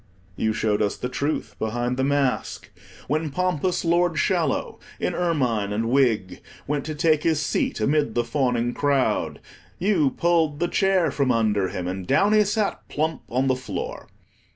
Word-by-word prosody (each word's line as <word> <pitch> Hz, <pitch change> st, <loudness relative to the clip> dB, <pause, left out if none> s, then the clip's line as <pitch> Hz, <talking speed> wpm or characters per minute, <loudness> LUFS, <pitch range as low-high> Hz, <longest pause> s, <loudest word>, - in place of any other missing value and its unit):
You 110 Hz, -, 0 dB
showed 110 Hz, -1 st, 0 dB
us 105 Hz, -1 st, 0 dB
the 125 Hz, -, -4 dB
truth 145 Hz, +4 st, -2 dB
behind 120 Hz, +3 st, -1 dB
the 130 Hz, -, -1 dB
mask. 135 Hz, -8 st, -1 dB, 0.4 s
When 155 Hz, +3 st, 0 dB
pompous 180 Hz, +2 st, -1 dB
Lord 170 Hz, -1 st, +2 dB
Shallow, -, -, 0 dB, 0.2 s
in -, -, -1 dB
ermine 125 Hz, -, 0 dB
and 115 Hz, +3 st, -1 dB
wig, 115 Hz, -8 st, +1 dB, 0.2 s
went 145 Hz, 0 st, -2 dB
to 155 Hz, 0 st, -4 dB
take 155 Hz, 0 st, +2 dB
his 160 Hz, -2 st, +1 dB
seat 145 Hz, -, -1 dB
amid 145 Hz, +2 st, +1 dB
the 120 Hz, -, +2 dB
fawning 120 Hz, -1 st, 0 dB
crowd, 140 Hz, -2 st, 0 dB, 0.4 s
you 180 Hz, -7 st, +2 dB
pulled 160 Hz, -1 st, +1 dB
the 175 Hz, -, +1 dB
chair 190 Hz, -6 st, +2 dB
from 135 Hz, -2 st, +1 dB
under 105 Hz, -4 st, +1 dB
him, 95 Hz, -2 st, -5 dB
and 95 Hz, 0 st, -4 dB
down 205 Hz, +2 st, +3 dB
he 215 Hz, 0 st, +6 dB
sat 210 Hz, 0 st, -1 dB
plump 155 Hz, +2 st, -1 dB
on 130 Hz, +3 st, +1 dB
the 130 Hz, -1 st, +2 dB
floor. 130 Hz, -, -6 dB
140 Hz, 165 wpm, -24 LUFS, 115-160 Hz, 0.4 s, he